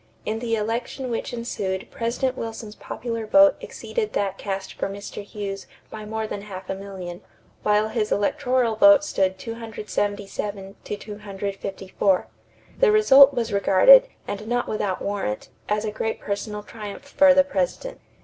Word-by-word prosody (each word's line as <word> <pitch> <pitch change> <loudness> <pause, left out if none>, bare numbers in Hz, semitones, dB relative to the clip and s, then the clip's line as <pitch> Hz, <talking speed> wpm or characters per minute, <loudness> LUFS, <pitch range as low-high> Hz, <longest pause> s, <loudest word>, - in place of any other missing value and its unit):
In 220 +1 -2
the 230 -1 -1
election 235 +4 -3
which 230 - -3
ensued 200 -6 -4
President 250 +3 -1
Wilson's 225 -3 -6
popular 230 0 -5
vote 290 +4 +7
exceeded 445 -3 -4
that 195 -1 0
cast 195 -1 -4
for - - -3
Mr. 200 +1 -7
Hughes 200 -1 -6 0.2
by 215 -1 -7
more 220 +1 -3
than 205 -1 -5
half 190 -2 -7
a - - 0
million, 190 -3 -8 0.4
while 210 +1 +2
his 220 -1 -1
electoral 250 +1 +1
vote 300 +5 +7
stood 190 -9 0
277 205 -3 -4
to 210 - -4
254. 200 -2 -2 0.5
The - - +5
result 265 +6 +7
was 230 -3 -1
regarded, - - +7 0.2
and 210 +2 -5
not 245 +1 0
without 205 -3 -2
warrant, 200 - -3 0.2
as 210 +1 0
a 215 - -2
great 220 +1 -3
personal 210 +1 -4
triumph 210 0 -8
for 285 0 +5
the 280 - +7
President. 280 - -3
210 Hz, 150 wpm, -24 LUFS, 200-235 Hz, 0.5 s, vote